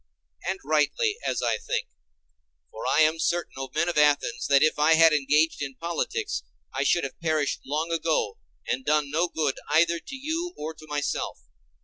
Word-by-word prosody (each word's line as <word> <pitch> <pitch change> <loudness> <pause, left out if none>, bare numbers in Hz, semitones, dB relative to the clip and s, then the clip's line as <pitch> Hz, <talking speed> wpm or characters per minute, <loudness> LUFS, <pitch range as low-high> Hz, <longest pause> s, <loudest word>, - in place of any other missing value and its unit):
And 190 - -1
rightly, 155 - +1
as - - -1
I 115 -2 +1
think. - - -2 0.9
For 110 - -6
I 155 - +4
am 155 +1 +3
certain, 170 +1 0
O 135 0 -5
men - - +2
of 175 -3 +1
Athens, 145 -5 +2
that 140 0 +5
if 155 -1 +2
I 155 +2 +5
had 165 -1 +6
engaged 150 +2 +2
in 135 -2 -4
politics, 170 - -2 0.3
I - - -1
should 175 - +2
have 135 - -6
perished 155 -3 0
long 155 +4 -1
ago 160 -11 0 0.3
and 130 - -1
done 150 0 +1
no 165 +4 +2
good 155 -5 -1
either 170 +1 +3
to 275 - -9
you 325 +6 -3
or 155 +1 -5
to 155 0 -15
myself. 145 -1 -2
155 Hz, 185 wpm, -26 LUFS, 145-170 Hz, 0.9 s, had